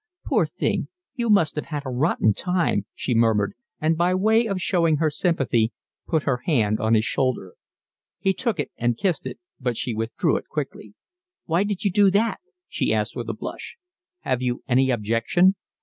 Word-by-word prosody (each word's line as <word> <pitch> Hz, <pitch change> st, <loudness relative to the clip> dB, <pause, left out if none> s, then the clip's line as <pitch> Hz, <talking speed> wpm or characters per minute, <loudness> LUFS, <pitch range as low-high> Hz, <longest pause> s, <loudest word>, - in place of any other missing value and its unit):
"Poor -, -, +2 dB
thing, -, -, -1 dB, 0.3 s
you 240 Hz, -4 st, -2 dB
must 185 Hz, -8 st, +4 dB
have 150 Hz, -, -3 dB
had 150 Hz, -3 st, -4 dB
a 130 Hz, -, -3 dB
rotten 125 Hz, -4 st, +2 dB
time," 170 Hz, -, 0 dB
she 125 Hz, -, -2 dB
murmured, 110 Hz, -3 st, +2 dB, 0.3 s
and 160 Hz, +1 st, +2 dB
by 175 Hz, +2 st, +2 dB
way 220 Hz, +4 st, +3 dB
of 195 Hz, -3 st, -2 dB
showing 170 Hz, -4 st, +2 dB
her 155 Hz, 0 st, +1 dB
sympathy 135 Hz, -9 st, +1 dB, 0.4 s
put 160 Hz, -3 st, +1 dB
her 130 Hz, -3 st, +1 dB
hand 110 Hz, -9 st, +2 dB
on 110 Hz, +1 st, +2 dB
his 110 Hz, 0 st, +2 dB
shoulder. 130 Hz, -8 st, -1 dB, 0.6 s
He 195 Hz, -1 st, +1 dB
took 230 Hz, -5 st, -2 dB
it 145 Hz, -, -2 dB
and 120 Hz, -1 st, 0 dB
kissed 175 Hz, -6 st, 0 dB
it, 130 Hz, -, -7 dB, 0.2 s
but 125 Hz, -3 st, -2 dB
she 125 Hz, -, -2 dB
withdrew 110 Hz, +1 st, 0 dB
it -, -, -8 dB
quickly. -, -, -6 dB, 0.5 s
"Why 170 Hz, +4 st, +2 dB
did 205 Hz, -2 st, -3 dB
you 200 Hz, -, +2 dB
do 200 Hz, +1 st, +5 dB
that?" 215 Hz, +4 st, +1 dB, 0.3 s
she -, -, -1 dB
asked, -, -, 0 dB
with -, -, -4 dB
a -, -, -1 dB
blush. -, -, -7 dB, 0.4 s
"Have 130 Hz, -1 st, -1 dB
you 125 Hz, -1 st, -2 dB
any 130 Hz, 0 st, +3 dB
objection?" 120 Hz, -, +2 dB
150 Hz, 185 wpm, -24 LUFS, 120-185 Hz, 0.6 s, do